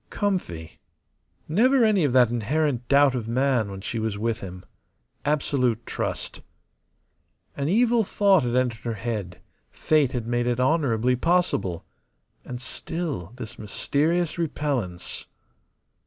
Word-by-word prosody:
Comfy. 175 - -3 0.7
Never 240 - +4
any 205 -5 +3
of 145 - +2
that 125 -2 +5
inherent 125 +2 0
doubt 140 -1 +5
of 120 -4 -3
man 125 -2 +1
when 95 -1 -7
she 110 +3 -3
was 110 -2 -2
with 115 +1 -1
him. 90 -1 -9 0.6
Absolute 135 -5 +1
trust. - - -4 1.1
An 140 +1 -1
evil 230 +3 +3
thought 200 -2 +3
had 120 -1 -1
entered 125 -3 +1
her 115 -2 -3
head; 105 -6 -4 0.3
fate 150 -5 +1
had 120 -3 -2
made 120 +1 0
it 120 0 0
honourably 125 -4 +2
possible. 130 - 0 0.6
And 125 -1 -6
still 130 - -4
this 120 -4 -8
mysterious 155 - 0
repellence. 135 - -3
125 Hz, 125 wpm, -25 LUFS, 110-155 Hz, 1.1 s, that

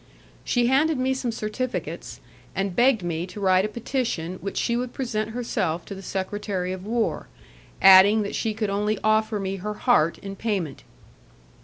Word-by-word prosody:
She 245 -1 +1
handed 285 +5 +3
me 260 +1 +1
some 255 -2 -2
certificates, 225 +3 -4 0.3
and 195 -1 -2
begged 240 -5 +3
me 170 0 -2
to 200 - -9
write 190 -1 +3
a - - 0
petition 215 -6 -3
which 195 - -5
she 235 - +1
would 245 0 -3
present 220 -5 -2
herself 185 -8 -2
to - - -7
the 195 - -8
secretary 190 -1 -3
of 185 +2 -8
war, 230 0 -1 0.6
adding 195 +3 +8
that 200 - -5
she 220 -2 -1
could 215 -2 -1
only 210 +1 0
offer 215 0 +2
me 195 0 -3
her 210 +3 -4
heart 160 -4 +2
in 195 0 -8
payment. 195 -9 -3
210 Hz, 170 wpm, -24 LUFS, 190-235 Hz, 0.6 s, adding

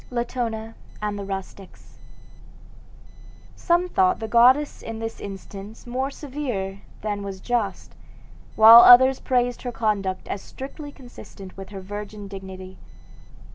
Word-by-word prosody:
LATONA 235 -2 -3 0.3
AND 210 -1 -3
THE 200 - -6
RUSTICS 195 0 -9 1.6
Some 350 +1 +1
thought 370 0 +2
the 220 - -4
goddess 255 +6 +4
in 225 0 -7
this 225 0 -6
instance 200 +2 -9
more 255 +3 -2
severe 255 -10 -5 0.2
than 205 -1 -3
was 195 -1 -7
just, 220 -4 -3 0.6
while 225 +2 +10
others 260 +2 +8
praised 245 -1 0
her 245 - -4
conduct 205 -5 -2
as 200 - -4
strictly 285 +2 -9
consistent 240 -7 -13
with 195 0 -10
her 195 -2 -8
virgin 205 +1 -8
dignity. 190 -1 -10
220 Hz, 125 wpm, -23 LUFS, 195-250 Hz, 1.6 s, while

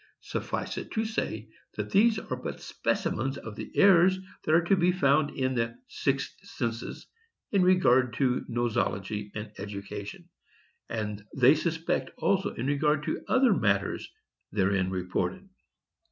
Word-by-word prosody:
Suffice - - -3
it - - -8
to 220 0 0
say, 115 - -3 0.3
that 105 -1 -4
these 220 +2 +5
are 130 - -4
but 125 - -6
specimens 135 +4 -1
of 110 -2 -8
the - - -7
errors 185 -1 +6 0.3
that 155 - +3
are 170 - +4
to 185 +3 +3
be 180 -1 +3
found 150 -4 +3
in 130 -1 -1
the 115 -1 -1
'sixth - - -1
census' 115 0 -4 0.5
in 200 - +3
regard 130 -10 +4
to 125 0 +1
nosology 110 -3 -1
and 105 0 -5
education, 100 - -7 0.6
and 105 -2 -3
they 130 +2 +7
suspect 160 +1 -1
also 195 -2 +1
in 120 - -3
regard 145 +1 +2
to - - -2
other 260 -4 +4
matters 100 - 0 0.4
therein 95 -2 +1
reported. 95 - -2
130 Hz, 140 wpm, -28 LUFS, 105-175 Hz, 0.6 s, they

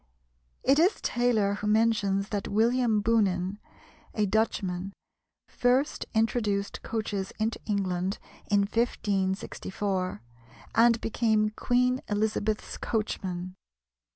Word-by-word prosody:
It 275 +3 +4
is 360 +6 +3
Taylor 235 -5 +1
who 205 +1 -4
mentions 210 -3 +2
that 205 -2 -2
William 225 0 +2
Boonen, 200 -3 +1 0.6
a 210 - +2
Dutchman, 195 -3 -1 0.5
first 255 +4 +1
introduced 215 -3 0
coaches 210 -4 -3
into 220 +1 -1
England 190 -2 -1 0.3
in 205 -1 +3
1564, 195 - -1 0.5
and 230 0 +5
became 220 -1 +1
Queen 250 +3 +1
Elizabeth's 215 0 -1
coachman. 185 -5 -3
210 Hz, 95 wpm, -28 LUFS, 195-230 Hz, 0.6 s, and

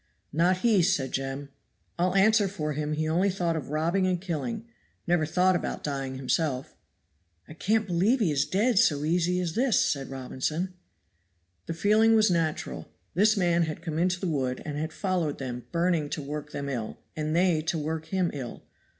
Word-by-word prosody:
"Not 175 +4 +3
he," 215 -5 +5
said 135 -5 +1
Jem. 135 +1 -3 0.5
"I'll 180 +2 +1
answer 210 +1 +5
for 155 -6 -3
him 150 +1 -2
he 155 +1 -1
only 175 +5 +2
thought 175 -3 -1
of 155 - -4
robbing 170 +5 +1
and 180 -1 +1
killing 195 +6 -3 0.4
never 170 -3 +2
thought 180 +3 +3
about - - -3
dying 135 -2 -3
himself." 135 0 -1 0.7
"I - - -10
can't 215 +6 +1
believe 195 +8 +2
he 195 -9 +2
is 140 0 +2
dead 205 +6 +2
so 145 -2 +3
easy 175 +3 +1
as 175 -3 -2
this," 245 +1 +3
said 140 -2 0
Robinson. 135 +7 -3 0.9
The 165 - -3
feeling 215 +5 +4
was 215 -3 +4
natural. 165 -3 -1 0.3
This 215 +5 +4
man 175 -2 +3
had 155 -1 -6
come 160 -2 -3
into 180 +1 +1
the 190 - -2
wood 130 -5 -1
and 150 -2 -4
had 155 +2 -3
followed 175 -5 -1
them 125 -2 -6
burning 170 -3 +1
to 150 - -3
work 150 +1 -5
them 140 - -4
ill, 120 -6 -4 0.2
and 155 0 -2
they 175 -3 +3
to 160 +1 -1
work 160 +1 -3
him 185 -1 0
ill. 130 -4 -6
165 Hz, 185 wpm, -27 LUFS, 150-185 Hz, 0.9 s, he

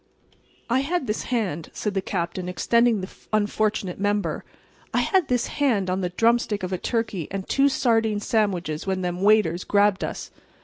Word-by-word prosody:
"I 245 +2 +2
had 300 +2 -1
this 210 -1 -2
hand," 195 - -2
said 210 - -3
the 195 - 0
Captain, 175 0 -3
extending 230 +4 +2
the 185 - -6 0.2
unfortunate 210 -3 0
member—"I 205 0 -3
had 375 -7 +2
this 245 -1 +1
hand 220 -11 0
on 185 +1 -1
the 180 - -1
drumstick 225 +1 +1
of 185 +1 -3
a 185 - -2
turkey 225 - -2
and 195 -1 -5
two 275 +1 +3
sardine 225 -5 +1
sandwiches 190 -7 -1
when 190 -1 0
them 180 0 -3
waiters 195 -4 +3
grabbed 205 -1 +2
us." - - -5
205 Hz, 165 wpm, -24 LUFS, 185-230 Hz, 0.2 s, two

